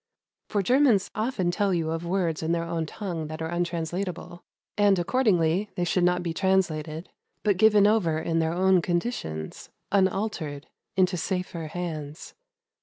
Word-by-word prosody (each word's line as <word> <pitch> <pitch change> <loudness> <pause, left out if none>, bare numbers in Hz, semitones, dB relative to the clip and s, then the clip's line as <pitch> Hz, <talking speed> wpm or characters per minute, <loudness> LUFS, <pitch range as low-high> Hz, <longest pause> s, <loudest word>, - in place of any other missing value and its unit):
For 205 -2 0
Germans 245 -3 +3
often 215 -6 -1
tell 195 +1 +1
you 160 -2 -1
of 165 +1 -3
words 175 -3 0
in 160 +1 0
their 170 0 0
own 165 -1 -3
tongue 170 -4 -5
that 155 +1 -7
are 160 0 -3
untranslatable; 175 +1 -3 0.3
and 205 -2 +4
accordingly 190 -2 +2
they 175 - -1
should 175 +1 +1
not 180 0 +2
be 170 -2 -2
translated, 165 -4 0 0.3
but 205 -3 +2
given 210 0 +5
over 205 -7 +3
in 165 +1 0
their 160 0 +1
own 185 +1 +3
conditions, 170 - -3 0.2
unaltered, 190 -7 0 0.3
into 185 -1 +3
safer 180 -2 -3
hands. 155 -2 -6
175 Hz, 150 wpm, -26 LUFS, 165-195 Hz, 0.3 s, given